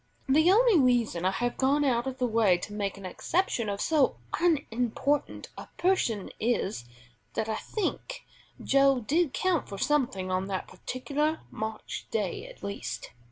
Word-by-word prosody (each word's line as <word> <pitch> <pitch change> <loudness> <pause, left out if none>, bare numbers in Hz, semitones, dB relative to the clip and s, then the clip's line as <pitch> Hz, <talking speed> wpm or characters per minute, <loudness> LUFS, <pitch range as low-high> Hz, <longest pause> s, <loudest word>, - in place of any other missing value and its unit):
The 310 +6 +5
only 445 -3 +5
reason 240 -9 +2
I - - +5
have 240 +6 -2
gone 280 +2 +2
out 240 -1 +1
of 260 -1 -4
the 255 - +1
way 220 -6 +3
to 205 +4 -7
make 200 -2 -2
an 195 - -9
exception 235 - -1
of 200 0 -3
so 295 - +2 0.2
unimportant 285 -4 0
a - - -9
person 295 - +1
is, 215 - -1 0.5
that 220 - -1
I 220 -1 -1
think 430 - -4 0.4
Joe 275 -1 +4
did 295 +6 +1
count 360 +1 0
for 200 - -6
something 240 -9 0
on 185 +1 0
that 190 -2 -3
particular 295 +5 -2
March 220 0 -5
day 435 +1 -2
at - - -14
least. 200 0 -5
255 Hz, 160 wpm, -28 LUFS, 210-305 Hz, 0.5 s, The